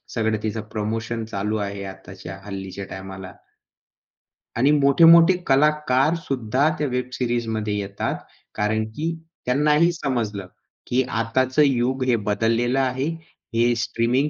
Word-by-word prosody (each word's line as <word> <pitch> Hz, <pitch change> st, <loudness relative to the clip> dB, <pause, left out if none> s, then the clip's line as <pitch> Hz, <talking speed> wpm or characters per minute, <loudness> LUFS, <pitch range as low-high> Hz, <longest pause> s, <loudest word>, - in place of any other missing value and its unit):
सगळं 110 Hz, -1 st, +1 dB
तिचं 110 Hz, 0 st, -2 dB
प्रमोशन 110 Hz, +2 st, -3 dB
चालू 105 Hz, 0 st, -2 dB
आहे 100 Hz, -1 st, -4 dB
आताच्या, 95 Hz, -1 st, -9 dB
हल्लीच्या 95 Hz, -1 st, -6 dB
टायमाला. 95 Hz, 0 st, -8 dB, 1.2 s
आणि 135 Hz, +5 st, +4 dB
मोठे-मोठे 165 Hz, +5 st, +7 dB
कलाकार 150 Hz, +1 st, +3 dB
सुद्धा 130 Hz, +2 st, +1 dB
त्या 150 Hz, -2 st, -1 dB
वेब 125 Hz, 0 st, -2 dB
सिरीजमध्ये 115 Hz, -4 st, -1 dB
येतात, 100 Hz, 0 st, -3 dB, 0.4 s
कारण 110 Hz, +1 st, 0 dB
की 165 Hz, +2 st, -2 dB, 0.3 s
त्यांनाही 150 Hz, +6 st, +3 dB
समजलं 115 Hz, -, -3 dB, 0.4 s
की 125 Hz, +1 st, +2 dB
आताचं 130 Hz, +4 st, 0 dB
युग 130 Hz, 0 st, +1 dB
हे 125 Hz, -2 st, +3 dB
बदललेलं 115 Hz, +4 st, +1 dB
आहे. 130 Hz, 0 st, 0 dB, 0.5 s
हे 120 Hz, +1 st, +3 dB
स्ट्रीमिंग 125 Hz, +6 st, +1 dB
120 Hz, 120 wpm, -23 LUFS, 105-135 Hz, 1.2 s, मोठे-मोठे